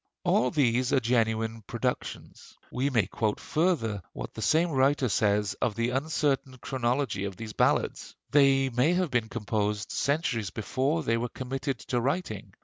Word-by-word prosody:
All 125 Hz, -, +3 dB
these 125 Hz, -2 st, +2 dB
are 135 Hz, -, +5 dB
genuine 115 Hz, -1 st, 0 dB
productions." 125 Hz, +1 st, -4 dB
We 130 Hz, +3 st, 0 dB
may 115 Hz, -8 st, +2 dB
quote 105 Hz, +2 st, -1 dB
further 150 Hz, -, 0 dB
what -, -, -7 dB
the 110 Hz, -, -7 dB
same 160 Hz, +10 st, +3 dB
writer 135 Hz, 0 st, +3 dB
says 105 Hz, -2 st, +2 dB
of 110 Hz, -, 0 dB
the 115 Hz, +1 st, 0 dB
uncertain 135 Hz, -1 st, 0 dB
chronology 125 Hz, -4 st, -1 dB
of 95 Hz, -2 st, -6 dB
these 110 Hz, -1 st, -7 dB
ballads: -, -, 0 dB, 0.2 s
"They 135 Hz, -2 st, +4 dB
may 130 Hz, +8 st, +2 dB
have 180 Hz, -4 st, 0 dB
been 120 Hz, -3 st, 0 dB
composed 105 Hz, -1 st, -2 dB
centuries 135 Hz, -, 0 dB
before 135 Hz, +8 st, -1 dB
they 115 Hz, -3 st, +1 dB
were 120 Hz, +1 st, -2 dB
committed 135 Hz, +2 st, -3 dB
to 120 Hz, -1 st, +1 dB
writing. 135 Hz, -, -3 dB
125 Hz, 155 wpm, -28 LUFS, 110-140 Hz, 0.2 s, are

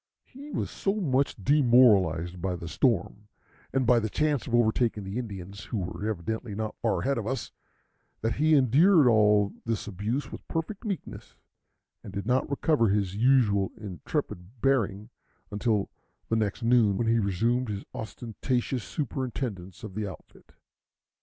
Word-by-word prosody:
He 280 Hz, +3 st, -12 dB
was -, -, -3 dB
so 195 Hz, +1 st, -1 dB
much 140 Hz, -9 st, +1 dB
demoralized 100 Hz, -, +4 dB
by 90 Hz, 0 st, -1 dB
the 85 Hz, -1 st, -7 dB
storm, 100 Hz, -, 0 dB, 0.4 s
and 135 Hz, -1 st, +1 dB
by 120 Hz, 0 st, +5 dB
the 110 Hz, -1 st, -2 dB
chance 150 Hz, +1 st, 0 dB
of 120 Hz, -, 0 dB
overtaking 115 Hz, -2 st, +2 dB
the 95 Hz, +5 st, -4 dB
Indians, 100 Hz, -4 st, -7 dB
who 115 Hz, -, -4 dB
were 95 Hz, +3 st, -3 dB
evidently 110 Hz, +3 st, -4 dB
not 110 Hz, 0 st, -3 dB
far 115 Hz, -, +1 dB
ahead 135 Hz, -2 st, 0 dB
of 110 Hz, -, -5 dB
us, 130 Hz, -1 st, -3 dB, 0.7 s
that 115 Hz, 0 st, -1 dB
he 155 Hz, +2 st, +4 dB
endured 145 Hz, -, +5 dB
all 105 Hz, -3 st, +4 dB
this 115 Hz, -2 st, -2 dB
abuse 105 Hz, +8 st, -3 dB
with -, -, -10 dB
perfect 190 Hz, +8 st, -4 dB
meekness, 195 Hz, -5 st, -6 dB, 0.7 s
and 100 Hz, -, -9 dB
did 100 Hz, 0 st, -4 dB
not 125 Hz, +4 st, +1 dB
recover 140 Hz, -5 st, +2 dB
his 100 Hz, -2 st, 0 dB
usual 110 Hz, -5 st, +3 dB
intrepid 95 Hz, -, -5 dB
bearing 115 Hz, -4 st, 0 dB, 0.4 s
until 105 Hz, -1 st, 0 dB, 0.4 s
the 115 Hz, -, +2 dB
next 110 Hz, +1 st, -1 dB
noon, 115 Hz, -4 st, +4 dB
when 115 Hz, -, 0 dB
he 115 Hz, +1 st, +3 dB
resumed 115 Hz, +5 st, 0 dB
his 100 Hz, -1 st, -4 dB
ostentatious 120 Hz, +2 st, -3 dB
superintendence 125 Hz, -, -4 dB
of 105 Hz, -3 st, -7 dB
the 105 Hz, 0 st, -3 dB
outfit. 95 Hz, -, -13 dB
115 Hz, 155 wpm, -27 LUFS, 100-130 Hz, 0.7 s, by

